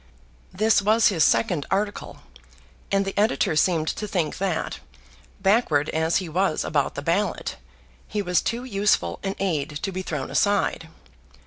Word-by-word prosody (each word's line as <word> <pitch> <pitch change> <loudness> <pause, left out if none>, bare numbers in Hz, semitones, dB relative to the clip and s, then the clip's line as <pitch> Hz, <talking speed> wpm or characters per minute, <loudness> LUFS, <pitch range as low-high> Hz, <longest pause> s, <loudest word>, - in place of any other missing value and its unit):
This 215 +2 +3
was 220 +3 +4
his 170 -6 +2
second 140 +6 +2
article, 205 +1 -3 0.7
and 195 0 +2
the 195 - -4
editor 205 -7 +1
seemed 160 -1 +2
to 210 - -4
think 170 -7 -2
that, 185 -4 -2 0.6
backward 190 -7 +2
as 160 +1 +1
he 185 - -3
was 175 +1 0
about 145 -3 0
the 145 - -5
ballot, 175 +7 -1 0.5
he 210 -1 -2
was 180 -1 +2
too 235 +2 -2
useful 210 -4 0
an 195 0 -3
aid 170 -6 -1
to 195 - -1
be 185 0 -4
thrown 150 -7 -4
aside. 200 -5 +1
190 Hz, 150 wpm, -24 LUFS, 160-205 Hz, 0.7 s, was